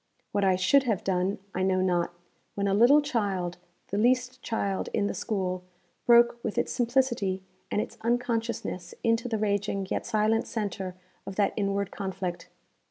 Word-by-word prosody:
What 200 - +1
I 190 -1 +4
should 190 +10 +4
have 220 -6 0
done 190 +1 0 0.2
I 185 - -1
know 185 0 +2
not, 175 -2 +1 0.4
when 200 0 0
a 195 - +2
little 250 +8 +6
child 195 -10 -1 0.3
the 200 - -1
least 250 +2 +2
child 200 -4 -2
in 205 - +2
the - - -1
school 185 -4 -2 0.4
broke 235 0 +5
with 220 - -3
its - - +1
simplicity 235 -6 +1 0.3
and - - 0
its 230 +2 -4
unconsciousness 230 -6 -1
into 230 +1 +1
the 225 - 0
raging 200 -2 0
yet - - -1
silent 220 +1 +2
centre 195 -4 -3 0.3
of 195 - -5
that 205 0 +2
inward 200 -1 -1
conflict. 190 -3 -4
205 Hz, 165 wpm, -28 LUFS, 190-235 Hz, 0.4 s, little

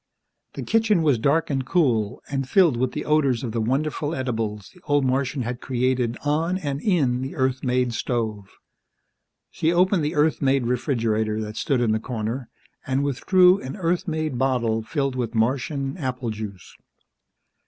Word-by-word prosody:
The - - -5
kitchen 220 -6 +2
was 140 -7 +3
dark 150 +5 +1
and 135 -1 0
cool, 125 - +1
and 135 -1 -3
filled 175 -7 +4
with 125 +1 -1
the - - -4
odors 140 -6 +2
of 120 - -3
the 115 0 -1
wonderful 145 +6 -1
edibles 115 -6 -3
the 180 - -20
old 145 -2 +2
Martian 130 +1 0
had 120 +1 -5
created 125 -2 0
on 160 +5 +1
and 145 -5 -3
in 140 - +1
the 135 +1 -5
Earth 130 -1 0
made 125 -1 +1
stove. 110 -5 -2 1.0
She 160 - 0
opened 180 0 +3
the 150 - -2
Earth 150 +1 +2
made 135 -2 +2
refrigerator 115 -4 0
that 105 0 -6
stood 130 0 0
in 115 -3 +2
the 110 - +1
corner 115 +2 -4 0.4
and 130 +1 +1
withdrew 180 +7 +4
an 130 - -6
Earth 180 +1 -1
made 155 -5 -2
bottle 120 -4 +1
filled 135 +3 -2
with 120 -2 -3
Martian 135 +4 0
apple 130 -6 -3
juice. 105 -4 -8
130 Hz, 165 wpm, -24 LUFS, 120-150 Hz, 1.0 s, filled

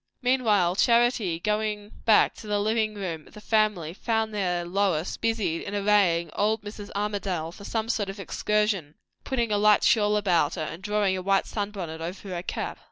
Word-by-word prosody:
Meanwhile, 215 -8 +2
Charity, 235 -8 +3
going 210 +1 -2
back 220 - +5
to 215 - -10
the 205 0 0
living 215 0 0
room 170 -6 -5
of - - -18
the - - -9
family, 210 -7 +1
found 220 +1 -1
there 180 -4 -1
Lois 180 -2 0
busied 210 -8 -1
in 205 - -5
arraying 195 -5 +2
old 215 +1 0
Mrs. 205 0 -8
Armadale 200 -5 -2
for 200 +3 -12
some 225 +1 -2
sort 210 -4 -1
of 195 +1 -7
excursion; 200 -5 -1 0.3
putting 235 -4 -1
a 205 - +2
light 210 0 +5
shawl 210 -1 +3
about 190 -5 +2
her, 160 - -3
and 165 +3 -6
drawing 205 -1 +1
a 185 - -3
white 195 +1 +2
sun 205 -2 -3
bonnet 170 -6 -6
over 185 +4 -6
her 175 -2 -3
cap. - - -4
205 Hz, 185 wpm, -26 LUFS, 180-215 Hz, 0.3 s, back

